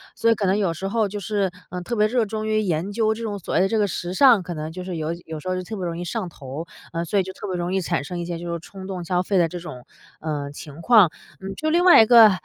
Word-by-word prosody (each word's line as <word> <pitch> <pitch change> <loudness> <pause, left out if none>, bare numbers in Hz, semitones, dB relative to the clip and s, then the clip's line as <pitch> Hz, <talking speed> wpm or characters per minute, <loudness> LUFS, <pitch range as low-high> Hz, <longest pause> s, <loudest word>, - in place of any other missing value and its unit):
所 230 - +3
以 - - +4
可 205 - -1
能 190 +1 +2
有 190 -5 +1
时 190 +4 -4
候 220 +1 +1
就 205 +1 -5
是， 200 -1 -1 0.2
呃， 180 0 -4
特 180 +7 -3
别 210 0 +4
热 235 0 +1
衷 215 +1 -4
于 215 0 +2
研 180 -1 -1
究 220 0 +2
这 225 - -8
种 210 -2 -3
所 175 - -6
谓 - - +4
的 190 - +3
这 225 - 0
个 205 - +2
时 175 0 -4
尚， 240 -1 +6
可 175 - -5
能 155 0 -5
就 180 +2 -7
是 185 -2 -4
有 155 0 -2
有 160 -1 -6
时 185 - -5
候 185 - 0
就 185 - -3
特 215 +5 -6
别 190 - -5
容 170 -1 -3
易 175 - -4
上 185 +1 -3
头， 140 +1 -7 0.3
呃， 165 0 -1
所 200 +5 +1
以 - - +2
就 190 +1 -7
特 - - -9
别 185 - -2
容 175 +1 -2
易 190 - +1
产 170 -3 -1
生 180 +3 -5
一 170 - -3
些 170 -1 -4
就 170 0 -4
是 170 - -3
冲 190 +2 -10
动 185 -2 -5
消 180 +1 0
费 195 +1 0
的 170 -2 +4
这 175 - -6
种， 150 -8 -9 0.4
呃， 150 -2 -3
情 145 +1 -10
况。 210 -4 +6 0.3
嗯， 195 +1 -5
就 310 - -1
另 345 +2 +3
外 355 -9 +9
一 - - +2
个 230 -1 +9
185 Hz, 340 characters per minute, -23 LUFS, 170-215 Hz, 0.4 s, 外